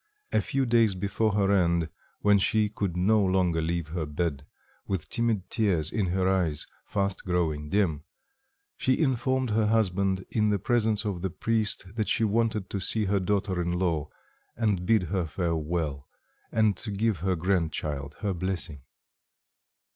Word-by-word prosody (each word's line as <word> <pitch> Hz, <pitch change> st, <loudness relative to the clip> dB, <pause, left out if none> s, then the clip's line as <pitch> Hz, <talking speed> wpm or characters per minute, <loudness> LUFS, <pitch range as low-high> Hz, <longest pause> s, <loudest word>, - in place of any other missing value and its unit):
A -, -, +3 dB
few 135 Hz, -1 st, 0 dB
days 115 Hz, -4 st, +3 dB
before 100 Hz, +3 st, 0 dB
her 100 Hz, -1 st, +2 dB
end, 85 Hz, -4 st, +2 dB, 0.3 s
when 105 Hz, -1 st, +5 dB
she 105 Hz, +2 st, +2 dB
could 100 Hz, -4 st, -3 dB
no 105 Hz, +4 st, +3 dB
longer 90 Hz, -3 st, +2 dB
leave 85 Hz, -1 st, -2 dB
her 80 Hz, -2 st, -3 dB
bed, 75 Hz, -2 st, -2 dB, 0.4 s
with 95 Hz, -5 st, -3 dB
timid 115 Hz, -5 st, 0 dB
tears 90 Hz, -8 st, +1 dB
in 105 Hz, -4 st, 0 dB
her 90 Hz, +1 st, +1 dB
eyes, 85 Hz, -6 st, +2 dB, 0.2 s
fast 100 Hz, -1 st, -2 dB
growing 80 Hz, -5 st, -1 dB
dim, 85 Hz, -7 st, +1 dB, 0.7 s
she 130 Hz, -1 st, +2 dB
informed 130 Hz, -3 st, +1 dB
her 110 Hz, 0 st, +2 dB
husband 95 Hz, -3 st, +1 dB
in 105 Hz, -1 st, +2 dB
the 105 Hz, -, +2 dB
presence 110 Hz, 0 st, +1 dB
of 95 Hz, -4 st, -2 dB
the 95 Hz, -, -1 dB
priest 110 Hz, +3 st, 0 dB
that 110 Hz, -, 0 dB
she -, -, +2 dB
wanted 110 Hz, -2 st, +1 dB
to 100 Hz, -, -2 dB
see 105 Hz, +3 st, 0 dB
her 100 Hz, +1 st, +1 dB
daughter 95 Hz, -1 st, 0 dB
in 85 Hz, 0 st, -1 dB
law 85 Hz, -4 st, 0 dB, 0.5 s
and 100 Hz, -6 st, 0 dB
bid 110 Hz, -4 st, +4 dB
her 90 Hz, 0 st, -1 dB
farewell, 80 Hz, -4 st, -2 dB, 0.4 s
and 110 Hz, -2 st, +3 dB
to 110 Hz, -, -5 dB
give 105 Hz, -1 st, 0 dB
her 95 Hz, +2 st, 0 dB
grand 85 Hz, -1 st, +1 dB
child 70 Hz, -2 st, -4 dB
her 100 Hz, -2 st, 0 dB
blessing. 90 Hz, -5 st, -3 dB
95 Hz, 160 wpm, -27 LUFS, 85-105 Hz, 0.7 s, when